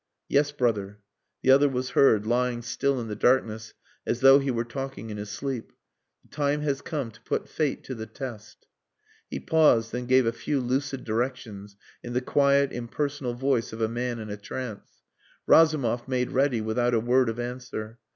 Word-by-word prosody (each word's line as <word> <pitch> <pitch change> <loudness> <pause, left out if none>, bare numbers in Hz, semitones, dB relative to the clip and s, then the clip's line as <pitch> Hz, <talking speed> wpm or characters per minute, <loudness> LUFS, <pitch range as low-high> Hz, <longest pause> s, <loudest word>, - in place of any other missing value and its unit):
"Yes, 145 +1 +2
brother." 105 -7 -1 0.5
The 130 - +5
other 140 +2 +6
was 130 -1 -3
heard, 110 -6 +4
lying 120 +1 0
still 130 +3 0
in 115 - -5
the 105 - -4
darkness 110 -2 +1 0.3
as 120 - -2
though 135 +1 +8
he 135 0 -2
were 120 -2 -1
talking 135 -2 -6
in 105 - -5
his 105 0 -6
sleep. 130 0 -5 0.5
"The - - -27
time 145 0 0
has 140 -2 -1
come 145 -8 -4
to 110 +1 -20
put - - -3
fate 150 -4 -2
to 130 - -6
the 110 -2 -7
test." 110 -3 -9 0.6
He - - -4
paused, 125 -8 +3
then 125 0 -4
gave 130 0 +4
a 115 - +2
few 140 +4 -2
lucid 130 +1 -2
directions 110 -4 -4 0.3
in 120 - -7
the 125 - +2
quiet 140 +1 +3
impersonal 130 +1 -3
voice 130 -3 0
of 110 - -7
a 110 - +2
man 120 +1 -3
in 110 -2 -7
a 105 - -5
trance. 110 +1 -8 0.4
Razumov 140 -8 +4
made 125 -1 -1
ready 135 -3 +2
without 120 +2 +1
a - - +3
word 125 +2 +2
of 115 +1 -4
answer. 120 -2 -6
125 Hz, 185 wpm, -26 LUFS, 115-135 Hz, 0.6 s, though